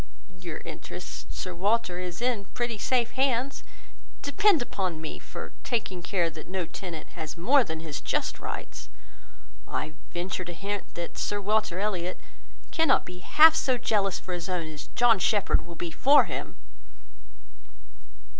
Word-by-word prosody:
Your 170 -3 -5
interest, 60 0 -7
Sir 185 - -5
Walter, 190 0 +1
is 180 +4 -4
in 240 -5 +1
pretty 240 -3 -1
safe 240 +1 +2
hands. 265 0 +1 0.6
Depend 395 +4 +4
upon 185 -9 -2
me 160 -1 -5
for - - -8
taking 200 -7 -1
care 175 -1 +1
that 155 0 -9
no 185 -1 -2
tenant 170 -2 -7
has 155 +1 -6
more 260 +10 +5
than 160 -6 -5
his 155 -3 -5
just - - -1
rights. - - -6 0.8
I 155 - -3 0.2
venture 180 +1 -2
to 175 0 -6
hint, 200 +3 -4
that 170 0 -5
Sir 205 - 0
Walter 210 -2 +1
Elliot 185 -3 -1 0.5
cannot 325 0 +4
be 180 0 -8
half 310 - +7
so 260 -5 +2
jealous 200 -5 +1
for 185 - -6
his 175 0 -4
own, 180 -3 -1
as 150 -2 -8
John 240 -4 +5
Shepherd 200 -4 +2
will 170 - -9
be 170 0 -4
for 280 - +6
him." - - -5
190 Hz, 155 wpm, -28 LUFS, 170-235 Hz, 0.8 s, half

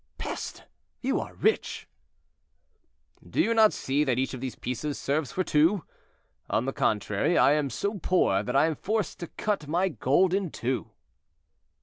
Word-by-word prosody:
"Peste! - - -5 0.4
you 265 +1 0
are - - -7
rich." 440 - 0 1.4
"Do - - -5
you 230 -7 +3
not 220 -2 +6
see 140 +3 0
that 130 -4 0
each 130 +1 -1
of 130 - -6
these 130 -2 -4
pieces 140 +4 -4
serves 145 0 -1
for 185 - 0
two? 165 +3 +3 0.7
On 115 - +1
the 135 - -2
contrary, 105 - +1
I - - +6
am 150 -2 +1
so 200 - -3
poor 160 - +2
that 105 - -4
I 140 - +5
am 160 - +1
forced 210 +3 -2
to 170 - -5
cut 200 -6 -2
my 175 +5 +1
gold 175 +4 +2
in 195 -2 0
two." 130 -2 -3
150 Hz, 165 wpm, -27 LUFS, 130-190 Hz, 1.4 s, not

